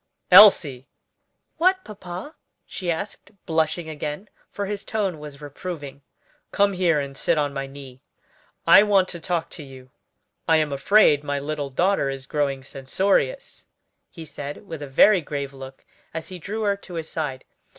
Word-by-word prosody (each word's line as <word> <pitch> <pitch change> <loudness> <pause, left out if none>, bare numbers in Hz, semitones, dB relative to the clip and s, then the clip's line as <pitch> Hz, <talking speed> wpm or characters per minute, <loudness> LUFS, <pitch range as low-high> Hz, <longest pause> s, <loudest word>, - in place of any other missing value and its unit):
"Elsie!" 145 -11 +7 0.7
"What, 375 +2 +2
papa?" 190 - -8 0.3
she 180 - -6
asked, 195 +5 -4 0.2
blushing 160 +1 0
again, 150 +5 -6 0.2
for 200 - -4
his 205 0 -4
tone 195 -7 -2
was 150 -1 -10
reproving. 145 -1 -7 0.5
"Come 200 0 +2
here 175 -4 +2
and 140 -1 -5
sit 145 - +1
on 145 -1 0
my 135 -1 -4
knee; 135 -2 -12 0.6
I 170 +4 +8
want 200 -3 +3
to 170 - -7
talk 165 0 -2
to 155 - -9
you. 130 -2 -14 0.6
I 160 - +5
am 155 -2 0
afraid 145 0 +4
my 145 -1 -2
little 145 0 -4
daughter 175 +1 +1
is 135 -1 -5
growing 140 -2 -2
censorious," 195 - -1 0.4
he 165 -3 -10
said, 145 +4 -8
with 160 -4 -7
a 145 - -6
very 185 +8 +5
grave 140 -2 -5
look 135 0 -11 0.3
as 160 - -5
he 185 -1 -8
drew 215 +6 -4
her 200 -1 +2
to 185 -3 -11
his 160 -1 -4
side. 140 -5 -4
155 Hz, 160 wpm, -23 LUFS, 140-190 Hz, 0.7 s, I